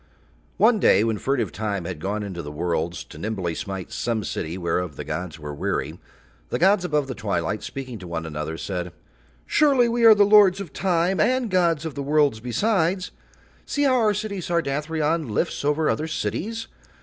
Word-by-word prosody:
One 220 0 +4
day 100 - +5
when 110 -2 0
furtive 125 -8 0
Time 100 -4 -3
had 90 -3 -5
gone 105 +4 -2
into 95 -4 -5
the 75 - -7
worlds 85 +2 -2
to - - -13
nimbly 95 -6 -2
smite 95 +1 -5
some 115 -3 -2
city 85 -1 -4
whereof 85 -2 -2
the - - -6
gods 90 -3 -5
were 75 -1 -7
weary, 70 - -3 0.5
the - - -1
gods 190 +1 +4
above 150 -5 0
the 135 - -5
twilight 100 -2 -2
speaking 130 -4 -6
to 90 - -9
one 85 -1 -4
another 80 0 -4
said: 90 -2 -4 0.5
"Surely 275 -5 +4
we 235 0 0
are 225 -1 +9
the 205 -1 +5
lords 200 -2 +6
of 190 -7 -7
Time 180 0 +1
and 250 +4 +2
gods 170 -4 +2
of 160 - -4
the 140 - -4
worlds 145 -4 +2
besides. 185 - 0 0.6
See 290 - 0
how 270 -2 +4
our 215 -2 +3
city 205 -2 -3
Sardathrion 160 -2 -1
lifts 105 - -1
over 150 +2 +1
other 155 - 0
cities. 170 - -3
140 Hz, 185 wpm, -24 LUFS, -, 0.6 s, are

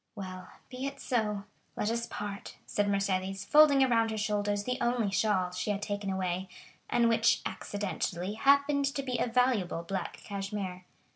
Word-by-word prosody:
"Well, 185 -3 -7 0.2
be 255 +2 -3
it 280 - -7
so—let 210 -2 -2
us 235 0 -2
part," 205 -1 -6
said 205 0 0
Mercédès, 195 -1 0
folding 295 -3 +6
around 230 -3 +3
her 220 - -3
shoulders 205 -1 0
the 250 +3 -2
only 240 -4 +1
shawl 195 -2 +1
she 180 +3 -3
had 205 0 -1
taken 205 -1 -3
away, 185 0 -2 0.4
and 235 -1 +3
which 230 0 +4
accidentally 195 -2 -3
happened 280 +4 +3
to 275 - -1
be 250 -2 -2
a - - +1
valuable 230 -8 +1
black 190 +1 -4
cashmere. 195 -2 -4
205 Hz, 155 wpm, -30 LUFS, 195-240 Hz, 0.4 s, folding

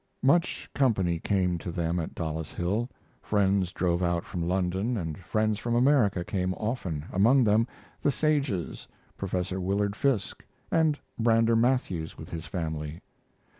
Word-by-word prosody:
Much 170 +7 +2
company 95 -11 +2
came 90 -2 +1
to 85 - -5
them 85 0 -1
at 80 - -5
Dollis 80 -1 -4
Hill. 105 +8 -1 0.3
Friends 100 -3 +1
drove 85 -1 0
out 85 -1 0
from 90 - -4
London, 95 +6 0
and 80 -5 -3
friends 110 +3 0
from 120 0 -1
America 120 -8 +3
came 95 -1 -1
often, 95 - -3
among 120 +8 +5
them 110 +2 +3 0.3
the 145 - +3
Sages, 140 - -1 0.3
Prof. 90 -2 -2
Willard 100 +2 0
Fiske, 125 -5 0 0.3
and 160 -2 +3 0.2
Brander 115 0 +4
Matthews 115 -9 0
with - - -10
his 80 -1 -5
family. 80 -2 -4
95 Hz, 140 wpm, -28 LUFS, 85-115 Hz, 0.3 s, among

